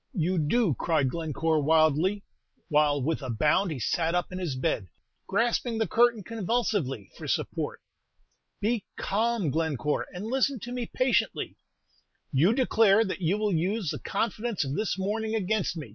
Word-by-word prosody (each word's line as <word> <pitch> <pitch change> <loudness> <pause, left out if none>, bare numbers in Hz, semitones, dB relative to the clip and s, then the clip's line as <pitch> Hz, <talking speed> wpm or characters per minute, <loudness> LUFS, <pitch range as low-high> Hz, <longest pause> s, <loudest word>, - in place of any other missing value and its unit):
"You 180 0 +1
do!" 170 - +2
cried 150 -6 +1
Glencore, 160 0 0
wildly, 160 +6 +3 0.5
while 150 -1 +3
with 160 +3 -1
a 130 - -5
bound 155 - +2
he 155 - -3
sat 165 - 0
up 180 +1 -1
in 185 - -5
his 170 -8 -2
bed, 115 -6 -1 0.4
grasping 230 +3 0
the 220 - +1
curtain 235 +1 +3
convulsively 205 - -1
for - - -8
support. - - -2 0.8
"Be 220 0 0
calm, 220 -5 0
Glencore, 150 -2 -1
and 180 +3 -6
listen 265 +2 +1
to 245 - -6
me 245 -2 -3
patiently." 255 -1 0 0.8
"You 150 +9 +4
declare 225 -4 +4
that 190 -1 -4
you 180 +4 +1
will 210 -2 0
use 180 +2 0
the - - -5
confidence 215 -2 -2
of 135 - -3
this 210 +4 -1
morning 220 +3 -1
against 210 -3 0
me!" 150 -7 -6
185 Hz, 160 wpm, -27 LUFS, 155-225 Hz, 0.8 s, You